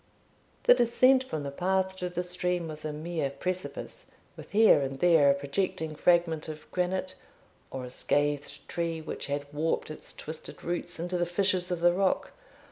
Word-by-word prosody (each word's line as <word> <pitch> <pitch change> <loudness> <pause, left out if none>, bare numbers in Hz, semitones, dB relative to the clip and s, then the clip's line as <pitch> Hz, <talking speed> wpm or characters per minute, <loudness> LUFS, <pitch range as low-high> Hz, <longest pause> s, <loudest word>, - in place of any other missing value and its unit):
The - - +8
descent 255 - +4
from 155 - -4
the 140 - -4
path 190 +4 0
to 180 -1 -3
the 180 0 -2
stream 180 -1 -1
was 155 -1 -7
a 155 - -2
mere 155 -1 -2
precipice, 185 +6 -5 0.3
with - - -11
here 215 -7 +6
and 135 0 -3
there 165 -4 +6
a 140 - +5
projecting 155 +2 -2
fragment 170 -1 +2
of 155 0 -8
granite, 185 +1 -1 0.6
or 130 -1 -5
a 125 - -9
scathed 145 +1 -1
tree, 170 -1 -2
which 155 -3 -6
had 145 0 -2
warped 155 +1 -1
its 155 - -7
twisted 155 +1 -8
roots 175 0 -3
into 175 +1 -2
the 175 - +1
fissures 185 0 +1
of 175 -2 -2
the 175 0 +5
rock. 190 +1 +1
170 Hz, 175 wpm, -29 LUFS, 150-185 Hz, 0.6 s, The